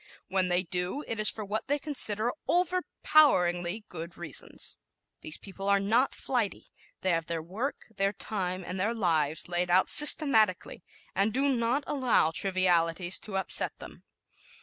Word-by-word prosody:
When 185 -1 0
they 180 0 +1
do, 180 - -3
it 225 - -5
is 215 - +3
for 215 - -6
what 210 +3 -4
they 290 +2 +1
consider 240 -6 +2 0.2
overpoweringly 230 - +2
good 170 0 -8
reasons. 175 -2 -3 0.4
These 155 - -5
people 195 0 -6
are 200 0 +4
not 225 +7 +1
flighty. 240 -6 -2 0.3
They 190 - +1
have 165 -1 -1
their 165 -1 -4
work, 215 - -4 0.2
their 195 0 +1
time 185 -3 -3
and 180 +1 -5
their 220 +5 0
lives 160 -6 0
laid 175 0 -1
out 185 +2 +4
systematically 225 - +4 0.3
and 200 +3 +1
do 270 +3 +1
not 240 +4 0
allow 255 - +1
trivialities 180 -1 +1
to 195 -3 -5
upset 190 - -1
them. - - -12
195 Hz, 150 wpm, -28 LUFS, 180-235 Hz, 0.4 s, are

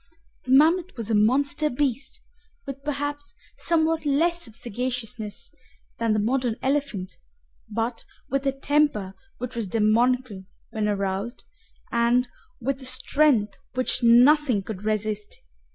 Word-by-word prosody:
The 255 - -3
mammoth 325 +4 +4
was 230 -1 -4
a - - +2
monster 275 +8 +2
beast, 275 0 -2 0.4
with 275 0 -7
perhaps 290 0 -4 0.2
somewhat 325 -1 +1
less 330 +3 +1
of 220 - -14
sagaciousness 240 -2 -4 0.5
than 230 -1 +1
the 215 - +1
modern 245 +1 0
elephant, 265 -9 -2 0.5
but 230 +2 -2 0.2
with 275 +1 -1
a - - +3
temper 275 -8 +1 0.2
which 250 0 -5
was 230 -3 -2
demoniacal 225 0 +1 0.3
when 215 -1 -1
aroused, 200 +3 -2 0.5
and 235 +2 +2 0.3
with 270 +2 -2
a - - -7
strength 255 -4 +2 0.2
which 255 0 +1
nothing 245 -1 +5
could 205 0 -7
resist. 215 -1 -2
250 Hz, 125 wpm, -25 LUFS, 215-280 Hz, 0.5 s, nothing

